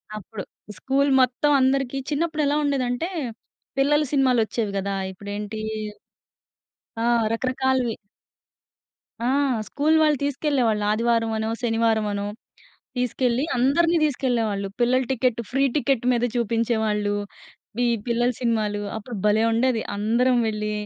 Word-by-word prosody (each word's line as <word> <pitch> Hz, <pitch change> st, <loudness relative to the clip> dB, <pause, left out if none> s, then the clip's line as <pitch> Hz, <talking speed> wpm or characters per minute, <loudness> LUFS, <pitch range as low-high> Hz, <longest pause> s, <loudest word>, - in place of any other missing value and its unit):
అప్పుడు. 210 Hz, 0 st, -7 dB, 0.3 s
స్కూల్ 275 Hz, +1 st, +1 dB
మొత్తం 255 Hz, +4 st, +2 dB
అందరికి 270 Hz, 0 st, +1 dB
చిన్నప్పుడెలా 300 Hz, -1 st, 0 dB
ఉండేదంటే, 275 Hz, +3 st, -1 dB, 0.7 s
పిల్లల 295 Hz, +2 st, +3 dB
సినిమాలొచ్చేవి 240 Hz, -6 st, +1 dB
గదా! 195 Hz, 0 st, -2 dB, 0.2 s
ఇప్పుడేంటీ 205 Hz, +3 st, -6 dB, 1.4 s
ఆ! -, -, +2 dB, 0.3 s
రకరకాలవి. 255 Hz, -1 st, 0 dB, 1.3 s
ఆ! -, -, +2 dB, 0.4 s
స్కూల్ 300 Hz, +2 st, +1 dB
వాళ్ళు 300 Hz, -2 st, +3 dB
తీసుకెళ్ళేవాళ్ళు 265 Hz, -7 st, +1 dB
ఆదివారవనో, 225 Hz, -1 st, +1 dB
శనివారవనో. 220 Hz, -3 st, +1 dB, 0.7 s
తీసుకెళ్ళి 250 Hz, +1 st, 0 dB
అందరిని 335 Hz, +7 st, +3 dB
తీసుకెళ్ళేవాళ్ళు. 230 Hz, -8 st, 0 dB
పిల్లల 255 Hz, +2 st, +3 dB
టికెట్, 250 Hz, -2 st, 0 dB
ఫ్రీ 270 Hz, +2 st, +2 dB
టికెట్ 275 Hz, -4 st, +1 dB
మీద 240 Hz, 0 st, +1 dB
చూపించేవాళ్ళు. 220 Hz, -3 st, 0 dB, 0.6 s
వీ 245 Hz, -, +2 dB, 0.2 s
పిల్లల 240 Hz, +1 st, +1 dB
సినిమాలు. 215 Hz, -3 st, 0 dB, 0.2 s
అప్పుడు 225 Hz, +2 st, -7 dB
భలే 210 Hz, +1 st, +3 dB
ఉండేది. 230 Hz, -1 st, +1 dB
అందరం 240 Hz, +4 st, +2 dB
వెళ్ళి, 210 Hz, -1 st, -2 dB
240 Hz, 100 wpm, -24 LUFS, 220-270 Hz, 1.4 s, పిల్లల